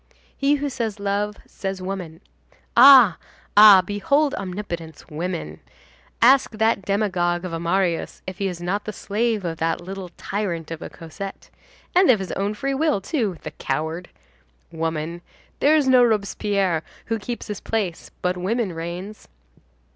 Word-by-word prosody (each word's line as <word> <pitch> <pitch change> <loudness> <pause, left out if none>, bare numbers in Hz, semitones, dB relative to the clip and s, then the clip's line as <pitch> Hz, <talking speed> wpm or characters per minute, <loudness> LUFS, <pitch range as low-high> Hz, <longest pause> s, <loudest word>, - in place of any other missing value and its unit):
He 280 +1 +2
who 290 0 -2
says 225 -6 -3
love, 205 +1 -1
says 195 -1 -5
woman. 185 -3 -6 0.5
Ah! 250 -6 +8 0.4
ah! 205 -3 +9
behold 280 +10 +1
omnipotence—women. 175 - -5 0.6
Ask 265 +3 +6
that 220 -1 +1
demagogue 185 -3 0
of 180 - -5
a 165 - -2
Marius 170 0 -1
if 185 0 -7
he 200 - 0
is 180 -2 -5
not 185 +4 -2
the 215 - -5
slave 215 -1 -1
of 165 -1 -3
that 165 0 0
little 185 +1 -7
tyrant 175 -6 -3
of 165 0 -6
a - - -6
Cosette. 195 +4 -9 0.4
And 365 +1 +5
of 245 - +6
his 190 -3 -5
own 200 +2 -2
free 275 +4 -2
will, 300 -4 +1
too, 210 - -2
the - - -6
coward! 160 +6 -3 0.6
Woman! 165 +1 -3 0.4
There 300 +2 +4
is 295 -3 +2
no 255 -1 +6
Robespierre 200 -5 +1 0.2
who 225 0 -2
keeps 240 +3 -5
his 210 -2 -5
place 200 -7 -3
but 180 0 0
woman 200 +1 -1
reigns. 175 +5 -7
195 Hz, 150 wpm, -23 LUFS, 175-220 Hz, 0.6 s, ah